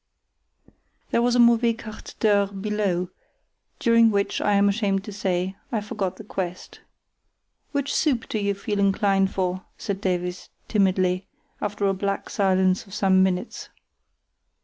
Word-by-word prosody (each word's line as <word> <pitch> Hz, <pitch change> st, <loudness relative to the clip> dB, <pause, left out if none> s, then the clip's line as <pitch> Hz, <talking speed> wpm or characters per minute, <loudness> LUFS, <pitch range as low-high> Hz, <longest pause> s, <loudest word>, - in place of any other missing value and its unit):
There 235 Hz, -, +3 dB
was 245 Hz, 0 st, +2 dB
a -, -, +3 dB
mauvais 235 Hz, -1 st, +5 dB
quart 215 Hz, -1 st, -10 dB
d'heure 205 Hz, -2 st, +3 dB
below, 195 Hz, -3 st, -2 dB, 0.7 s
during 230 Hz, -1 st, +5 dB
which, 200 Hz, -2 st, 0 dB
I 205 Hz, -, +2 dB
am 200 Hz, 0 st, +4 dB
ashamed 200 Hz, -2 st, 0 dB
to 210 Hz, -, -8 dB
say, 190 Hz, -2 st, -1 dB, 0.2 s
I 225 Hz, -, 0 dB
forgot 205 Hz, -3 st, -3 dB
the -, -, -9 dB
quest. 185 Hz, -3 st, -5 dB, 0.9 s
"Which 280 Hz, -1 st, -1 dB
soup 265 Hz, -7 st, +1 dB
do 215 Hz, -, -2 dB
you 200 Hz, -1 st, 0 dB
feel 205 Hz, +1 st, -3 dB
inclined 195 Hz, -1 st, +2 dB
for?" 185 Hz, 0 st, -2 dB
said 200 Hz, -1 st, -4 dB
Davies, 180 Hz, -1 st, -2 dB, 0.2 s
timidly, 185 Hz, -3 st, +1 dB, 0.3 s
after 205 Hz, 0 st, -2 dB
a 195 Hz, -, +3 dB
black 200 Hz, +1 st, -3 dB
silence 190 Hz, 0 st, +2 dB
of 195 Hz, -, -9 dB
some 190 Hz, -2 st, +4 dB
minutes. 190 Hz, +4 st, -1 dB
200 Hz, 145 wpm, -24 LUFS, 190-215 Hz, 0.9 s, mauvais